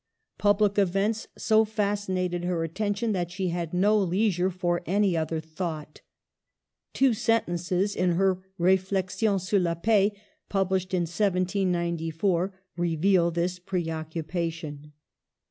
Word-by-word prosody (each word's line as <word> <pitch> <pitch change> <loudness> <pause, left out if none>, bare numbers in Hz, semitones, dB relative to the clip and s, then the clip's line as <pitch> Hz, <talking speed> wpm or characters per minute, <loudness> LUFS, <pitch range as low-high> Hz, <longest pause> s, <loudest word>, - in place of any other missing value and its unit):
Public 205 0 +3
events 200 +3 +1
so 220 0 +4
fascinated 200 -4 -1
her 175 -2 -1
attention 205 +6 -1
that 175 -4 -1
she 185 +1 -2
had 170 -2 -3
no 200 +4 +3
leisure 185 -1 +1
for 175 -1 -1
any 195 -1 +2
other 160 0 -1
thought. 160 -1 -6 0.9
Two 270 -3 +3
sen 225 +1 +2
tences 175 +3 -1
in 180 -1 +2
her 185 +1 +1
Reflexions 190 +2 +1
sur 200 0 +3
la 170 -2 0
Paix, 205 +2 +2 0.3
published 190 -1 0
in 180 - +1
1794, 175 -1 0 0.2
reveal 175 +1 +2
this 175 +2 -2
preoccupation. 165 -3 -4
185 Hz, 115 wpm, -27 LUFS, 170-200 Hz, 0.9 s, so